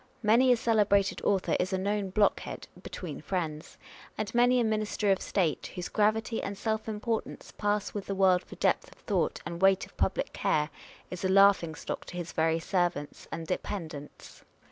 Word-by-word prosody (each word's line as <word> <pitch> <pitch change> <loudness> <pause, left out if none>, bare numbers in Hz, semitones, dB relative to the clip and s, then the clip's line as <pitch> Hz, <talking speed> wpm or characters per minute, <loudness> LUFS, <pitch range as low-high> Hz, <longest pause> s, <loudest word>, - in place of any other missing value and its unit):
Many 235 +4 +5
a 245 - +5
celebrated 210 -3 +2
author 195 -2 +1
is 185 +1 0
a - - +2
known 200 +1 -1
blockhead 205 +2 0
(between - - -7
friends); 160 -5 -4 0.4
and 215 -2 -3
many 245 +1 +4
a - - +3
minister 215 -2 0
of 190 - +1
state, 175 -7 0
whose 180 -1 -4
gravity 220 +2 +1
and 200 0 -5
self 220 +1 -2
importance 220 +1 -4
pass 205 -1 -1
with 205 -2 -5
the 195 - -2
world 185 -2 +4
for - - -12
depth - - +1
of - - -18
thought - - 0
and 170 +1 -5
weight 195 -1 +4
of - - -21
public - - 0
care, 150 +1 0 0.4
is 180 0 -6
a 190 - +1
laughingstock 190 -4 +3
to 175 - -8
his 175 -1 -5
very 160 0 +2
servants 170 -4 -2
and 165 0 -4
dependents. 160 -4 -6
195 Hz, 175 wpm, -29 LUFS, 175-215 Hz, 0.4 s, Many